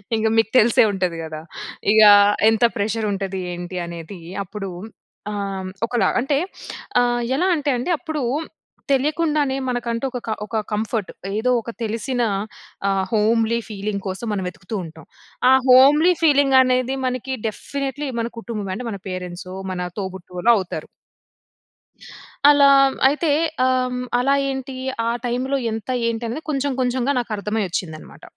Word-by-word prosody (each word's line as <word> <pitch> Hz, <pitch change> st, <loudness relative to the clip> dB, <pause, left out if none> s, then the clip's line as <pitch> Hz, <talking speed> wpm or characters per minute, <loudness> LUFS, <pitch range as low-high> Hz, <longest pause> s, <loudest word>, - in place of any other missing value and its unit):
ఇంగ 220 Hz, 0 st, +1 dB
మీకు 225 Hz, 0 st, +3 dB
తెలిసే 230 Hz, 0 st, +5 dB
ఉంటది 185 Hz, -4 st, -2 dB
గదా! 155 Hz, -1 st, -6 dB, 0.5 s
ఇగ 220 Hz, 0 st, +6 dB, 0.5 s
"ఎంత 225 Hz, +1 st, +1 dB
ప్రెషర్ 215 Hz, +1 st, -1 dB
ఉంటది, 195 Hz, -1 st, -3 dB
ఏంటి" 175 Hz, +1 st, -6 dB
అనేది. 170 Hz, +1 st, -8 dB, 0.2 s
అప్పుడు 195 Hz, 0 st, -6 dB, 0.6 s
ఆహ్, 195 Hz, -2 st, -4 dB, 0.2 s
ఒకలా 240 Hz, 0 st, +1 dB
అంటే 275 Hz, +3 st, +1 dB, 0.6 s
ఆహ్, 240 Hz, 0 st, +1 dB
ఎలా 360 Hz, +6 st, +1 dB
అంటే 290 Hz, -2 st, -2 dB
అండి 255 Hz, +9 st, -2 dB
అప్పుడు 310 Hz, -2 st, -4 dB, 0.7 s
తెలియకుండానే 295 Hz, 0 st, +1 dB
మనకంటూ 240 Hz, 0 st, -2 dB
ఒక 250 Hz, -, -4 dB
క -, -, -3 dB, 0.2 s
ఒక 220 Hz, +1 st, -2 dB
కంఫర్ట్. 215 Hz, -1 st, -2 dB, 0.3 s
ఏదో 250 Hz, +3 st, 0 dB
ఒక 235 Hz, -, -9 dB
తెలిసిన 230 Hz, +3 st, -2 dB, 0.7 s
ఆహ్, 195 Hz, -1 st, +1 dB
హోమ్లీ 225 Hz, +2 st, +2 dB
ఫీలింగ్ 200 Hz, -1 st, -4 dB
కోసం 190 Hz, +5 st, -4 dB
మనం 190 Hz, -2 st, -2 dB
వెతుకుతూ 185 Hz, +4 st, -8 dB
ఉంటాం. 160 Hz, -1 st, -12 dB, 0.4 s
ఆ -, -, +7 dB, 0.2 s
హోమ్లీ 295 Hz, +7 st, +7 dB
ఫీలింగ్ 285 Hz, -3 st, +4 dB
అనేది 255 Hz, +1 st, +1 dB
మనకి 255 Hz, +1 st, -3 dB
డెఫినెట్లీ 275 Hz, +5 st, -4 dB
మన 230 Hz, -, -1 dB
కుటుంబం 210 Hz, -4 st, -5 dB
అంటే 250 Hz, -, -6 dB
మన 200 Hz, -, -6 dB
పేరెంట్సో, 185 Hz, 0 st, -6 dB, 0.2 s
మన 180 Hz, -1 st, -3 dB
తోబుట్టువులో 190 Hz, +2 st, -1 dB
అవుతారు. 185 Hz, -2 st, -5 dB, 1.6 s
అలా 285 Hz, -1 st, +6 dB, 0.4 s
అయితే 300 Hz, +2 st, 0 dB, 0.4 s
ఆహ్, 255 Hz, -1 st, +1 dB, 0.2 s
అలా 275 Hz, +3 st, +2 dB, 0.2 s
ఏంటి? 265 Hz, 0 st, -5 dB, 0.3 s
ఆ 230 Hz, -, +1 dB, 0.2 s
టైమ్‌లో 255 Hz, +3 st, -1 dB
ఎంత? 220 Hz, +2 st, -6 dB, 0.2 s
ఏంటి? 230 Hz, 0 st, -2 dB
అనేది 280 Hz, +8 st, -5 dB
కొంచెం 280 Hz, -1 st, 0 dB
కొంచెంగా 250 Hz, +1 st, 0 dB
నాకర్థమై 215 Hz, -2 st, -2 dB
ఒచ్చిందన్నమాట. 160 Hz, -3 st, -6 dB
230 Hz, 135 wpm, -21 LUFS, 195-265 Hz, 1.6 s, ఆ